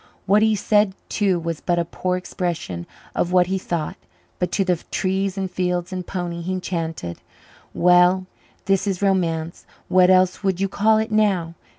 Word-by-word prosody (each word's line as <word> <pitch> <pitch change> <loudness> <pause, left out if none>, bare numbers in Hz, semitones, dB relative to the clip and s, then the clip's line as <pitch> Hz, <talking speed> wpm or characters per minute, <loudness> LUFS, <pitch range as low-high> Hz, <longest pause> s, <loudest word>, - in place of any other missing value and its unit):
What 205 +3 +4
he 220 0 +3
said 205 -1 +2
too 195 -4 +1
was 165 -1 -4
but 175 -1 0
a 170 - +1
poor 180 +2 -2
expression 170 - -4 0.3
of 175 - -1
what 180 -1 +5
he 190 +1 -1
thought, 170 -4 -3 0.4
but 180 -1 -1
to 195 - +1
the 180 -2 +2
trees 190 +1 -1
and 195 - -1
fields 180 0 -1
and 180 -1 -5
pony 175 -2 -4
he 185 +2 -2
chanted, 165 - -4 0.6
"Well, 180 +1 +4 0.4
this 195 +1 +1
is 195 -1 -1
romance. 170 -4 0 0.3
What 185 0 +5
else 185 +1 +3
would 190 -2 0
you 195 - +1
call 215 +3 +3
it 220 +1 -1
now? 195 -6 +1
185 Hz, 175 wpm, -22 LUFS, 175-195 Hz, 0.6 s, what